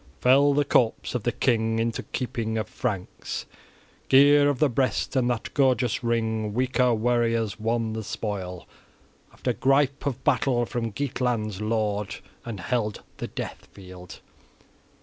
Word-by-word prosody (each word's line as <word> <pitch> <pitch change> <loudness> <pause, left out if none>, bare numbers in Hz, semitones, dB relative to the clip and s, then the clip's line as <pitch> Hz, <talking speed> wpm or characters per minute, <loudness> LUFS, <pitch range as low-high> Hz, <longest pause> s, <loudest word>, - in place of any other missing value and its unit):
Fell 140 +3 +5
the 145 0 +2
corpse 120 -5 +1
of 125 - -1
the 120 - 0
king 115 -3 +1
into 115 0 -1
keeping 115 -3 -3
of 110 -3 -2
Franks, 100 -7 -4 0.6
gear 145 +2 +6
of 145 - 0
the 150 - +4
breast, 130 +2 -1
and 125 -2 +2
that 120 -2 -3
gorgeous 130 -5 +2
ring; 110 -2 -1
weaker 125 0 +2
warriors 115 -2 +1
won 115 0 -1
the 110 0 -4
spoil, 100 -4 -5 0.6
after - - -2
gripe 135 +1 +2
of 130 -1 -3
battle, 120 -3 +2
from 115 -1 -3
Geatland's 120 -5 -2
lord, 105 -1 -1 0.3
and 110 -5 -6
held 110 0 -2
the - - -4
death - - -7
field. 90 -2 -11
115 Hz, 140 wpm, -26 LUFS, 110-130 Hz, 0.6 s, gear